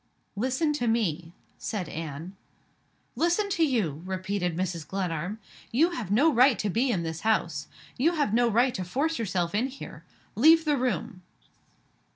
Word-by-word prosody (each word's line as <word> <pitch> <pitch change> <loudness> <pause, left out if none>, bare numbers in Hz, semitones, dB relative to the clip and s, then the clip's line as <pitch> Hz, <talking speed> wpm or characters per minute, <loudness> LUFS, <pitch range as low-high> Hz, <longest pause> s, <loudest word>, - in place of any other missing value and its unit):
"Listen 260 +8 0
to 245 -5 -1
me," 175 -8 0 0.3
said 200 -6 -3
Anne. 160 +4 -6 0.8
"Listen 345 +5 +1
to 365 -4 +1
you?" 205 - 0
repeated 185 -2 -2
Mrs. 175 -4 -3
Glenarm. 180 +1 -3 0.3
"You 320 +9 +3
have 245 - -5
no 280 +11 +4
right 255 +1 +5
to 210 - -1
be 245 +7 +1
in 185 -8 0
this 160 -1 -4
house. 170 -8 0 0.3
You 325 +7 +3
have 290 -10 0
no 240 +1 +4
right 240 +3 +3
to 185 - -3
force 280 - -1
yourself 180 -5 -1
in 225 +5 +1
here. 255 - -10 0.3
Leave 320 +8 +6
the 300 -1 +3
room!" 245 -6 -2
220 Hz, 160 wpm, -27 LUFS, 180-265 Hz, 0.8 s, Leave